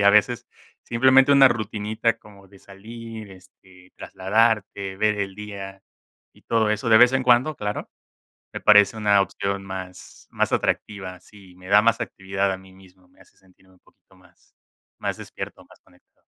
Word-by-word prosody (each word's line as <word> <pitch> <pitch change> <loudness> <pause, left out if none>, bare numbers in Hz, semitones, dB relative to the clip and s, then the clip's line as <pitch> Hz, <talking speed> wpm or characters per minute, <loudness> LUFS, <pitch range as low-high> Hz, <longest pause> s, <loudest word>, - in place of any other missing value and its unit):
y - - +2
a 100 - +7
veces 120 +4 +2 0.4
simplemente 130 +3 +4
una 135 -1 +7
rutinita, 110 0 -2
como 100 -3 -18
de 100 +1 -19
salir, 110 +1 -11
este, 95 0 -20
trasladarte, 100 -1 -1
ver 105 0 +1
el 95 -1 -3
día 100 -2 -9 0.5
y - - -24
todo 110 -2 +1
eso, 105 +2 -2
de 110 -1 +7
vez 125 +1 +6
en 130 -1 0
cuando, 125 +5 +3
claro, 105 0 -4 0.7
me - - -5
parece 105 +2 +5
una 105 -2 +3
opción 100 +1 -3
más 95 -1 -10
más - - -1
atractiva 95 -3 -2
si 95 -1 -18
me 90 0 -15
da 100 +2 +5
más 115 0 +2
actividad 95 0 -2
a - - -4
mí 95 0 -17
mismo, 95 -1 -21
me 90 +1 -30
hace 95 - -22
sentirme 95 0 -26
un 90 - -28
poquito - - -28
más - - -26 0.5
más - - -3
despierto - - -9
más - - -21
conectado. - - -30
100 Hz, 170 wpm, -23 LUFS, 95-110 Hz, 0.7 s, a